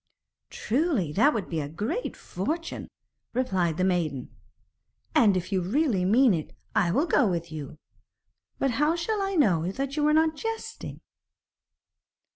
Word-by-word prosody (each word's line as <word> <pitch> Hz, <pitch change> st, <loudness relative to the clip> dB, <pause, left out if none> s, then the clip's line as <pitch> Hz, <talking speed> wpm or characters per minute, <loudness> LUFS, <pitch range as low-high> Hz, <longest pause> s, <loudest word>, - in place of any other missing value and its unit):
'Truly, 245 Hz, -, 0 dB
that 280 Hz, -, +4 dB
would 220 Hz, -9 st, -3 dB
be 165 Hz, -, -2 dB
a 145 Hz, -, -5 dB
great 210 Hz, -, -3 dB
fortune,' 320 Hz, -, -4 dB, 0.5 s
replied 185 Hz, -10 st, 0 dB
the 185 Hz, -, +1 dB
maiden. 165 Hz, -8 st, -1 dB, 0.8 s
'And, 205 Hz, -5 st, +5 dB
if 185 Hz, +2 st, -4 dB
you 190 Hz, -2 st, +1 dB
really 210 Hz, -, +1 dB
mean 235 Hz, +4 st, +5 dB
it, 160 Hz, -3 st, -4 dB, 0.2 s
I 175 Hz, -, +2 dB
will 280 Hz, -, +2 dB
go 295 Hz, -7 st, +3 dB
with 170 Hz, -3 st, -2 dB
you. 150 Hz, -1 st, -7 dB, 0.8 s
But 270 Hz, -, +1 dB
how 295 Hz, +7 st, +2 dB
shall 400 Hz, +5 st, -1 dB
I 390 Hz, 0 st, -1 dB
know 185 Hz, -, +2 dB
that 275 Hz, +5 st, -3 dB
you 300 Hz, 0 st, +3 dB
are 300 Hz, -, +4 dB
not 315 Hz, 0 st, +3 dB
jesting?' 450 Hz, +7 st, -6 dB
215 Hz, 150 wpm, -27 LUFS, -, 0.8 s, And